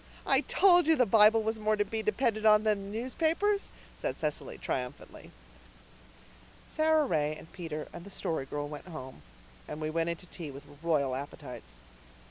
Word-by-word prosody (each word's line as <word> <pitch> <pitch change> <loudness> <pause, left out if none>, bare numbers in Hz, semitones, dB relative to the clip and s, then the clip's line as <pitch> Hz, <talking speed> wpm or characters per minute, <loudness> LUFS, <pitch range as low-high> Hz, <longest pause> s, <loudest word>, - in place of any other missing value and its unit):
"I - - +4
told 355 -4 +5
you 320 - +6
the 255 - +4
Bible 220 +1 +6
was 220 0 -1
more 215 0 +2
to 205 0 +1
be 220 +2 -3
depended 215 +1 0
on 210 -1 +6
than 210 -2 +1
the 215 - -4
newspapers," 330 - 0 0.2
said - - -3
Cecily - - -3
triumphantly. - - -5 1.4
Sara 315 -1 +3
Ray 155 - 0
and 160 - -13
Peter 160 -4 -5
and 170 - -8
the 200 - -10
Story 160 -7 -3
Girl 145 +1 -3
went 145 +2 -9
home, 130 - -9 0.5
and 150 - -6
we 155 0 -2
went 165 +1 0
in 170 - -1
to 180 - -9
tea 165 -3 -7
with 140 0 -9 0.2
royal 150 -6 +1
appetites. 125 - -8
195 Hz, 175 wpm, -30 LUFS, 150-225 Hz, 1.4 s, you